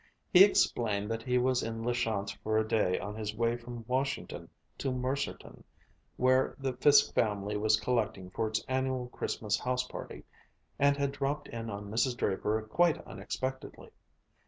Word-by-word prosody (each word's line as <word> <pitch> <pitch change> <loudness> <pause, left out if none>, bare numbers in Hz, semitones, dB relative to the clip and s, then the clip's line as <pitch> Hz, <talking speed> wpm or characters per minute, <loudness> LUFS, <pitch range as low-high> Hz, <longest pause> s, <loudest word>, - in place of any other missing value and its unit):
He 185 +1 +10
explained 110 - +2
that 115 0 -2
he 125 +1 +1
was 125 0 +2
in 115 0 -4
La 120 +1 0
Chance 105 -4 -1
for 110 0 +1
a 110 0 +1
day 105 -5 +2
on 100 +1 -5
his 110 -1 -4
way 115 +1 +1
from 120 -1 -8
Washington 135 +2 -2 0.3
to 135 - -1
Mercerton, 130 +2 -3 0.5
where 130 +1 +3
the 135 -2 -2
Fiske 145 +3 +5
family 105 -1 0
was 110 +1 +3
collecting 110 -7 -1
for 110 - -1
its 110 0 -2
annual 130 -1 -1
Christmas 105 -3 -2
house 125 0 0
party, 125 - -8 0.6
and 140 0 +4
had 140 -1 0
dropped 140 +1 -3
in 115 -1 -5
on 100 0 -6
Mrs. 120 +2 +1
Draper 105 +2 0
quite 165 +10 +2
unexpectedly. 130 +7 -6
120 Hz, 160 wpm, -31 LUFS, 110-130 Hz, 0.6 s, He